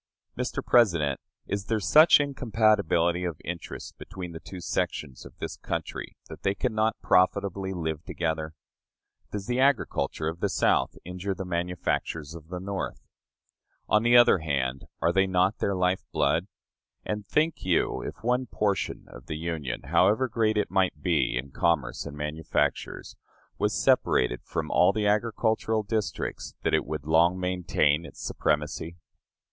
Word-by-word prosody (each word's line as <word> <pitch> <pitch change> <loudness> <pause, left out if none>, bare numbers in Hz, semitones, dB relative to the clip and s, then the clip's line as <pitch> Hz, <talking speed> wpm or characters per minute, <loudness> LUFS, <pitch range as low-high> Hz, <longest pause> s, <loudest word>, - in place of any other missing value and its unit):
Mr. - - -3
President, 85 - +3 0.3
is 100 -1 -3
there 110 +1 0
such 155 - +7
incompatibility 110 - +2
of 85 -4 -3
interest 85 0 -6
between 95 -3 -7
the 80 - -8
two 95 - -9
sections 75 -4 -3
of - - -19
this - - -5
country - - -5
that - - -10
they 95 0 0
can 125 +1 -1
not 110 +1 +1
profitably 95 +1 +2
live 80 -3 -3
together? 80 -1 -3 0.8
Does 100 -2 -4
the 125 +3 -1
agriculture 130 - +1
of 80 +1 -3
the - - 0
South - - +1
injure 90 +2 -4
the 95 - -5
manufactures 85 -3 -2
of 80 -2 -11
the 90 +1 -5
North? 95 +1 -4 0.9
On 105 - +4
the 120 +1 +6
other 120 -6 +6
hand, 70 -4 -2 0.2
are 85 - +3
they 95 +1 +3
not 95 +2 +2
their 100 - 0
life 90 0 +1
blood? 85 +4 +1 0.6
And 105 -1 -4
think 155 +1 +1
you, 90 -2 +1
if - - -7
one 125 +2 +1
portion 105 -3 -1
of - - -13
the 80 - -4
Union, 80 -6 -4
however 120 +6 +3
great 110 -2 +1
it 105 - 0
might 90 -6 +1
be 85 -8 +1
in 70 +2 -5
commerce 75 -6 0
and 70 - -8
manufactures, 75 +2 -2 0.4
was - - +1
separated 60 0 +2
from - - -4
all 90 +2 +5
the 110 -1 -1
agricultural 110 +1 +1
districts, 110 0 -3
that - - 0
it - - +2
would 75 0 -5
long 85 +4 +3
maintain 85 -4 +1
its - - -14
supremacy? 75 +3 -1
90 Hz, 155 wpm, -27 LUFS, 80-105 Hz, 0.9 s, such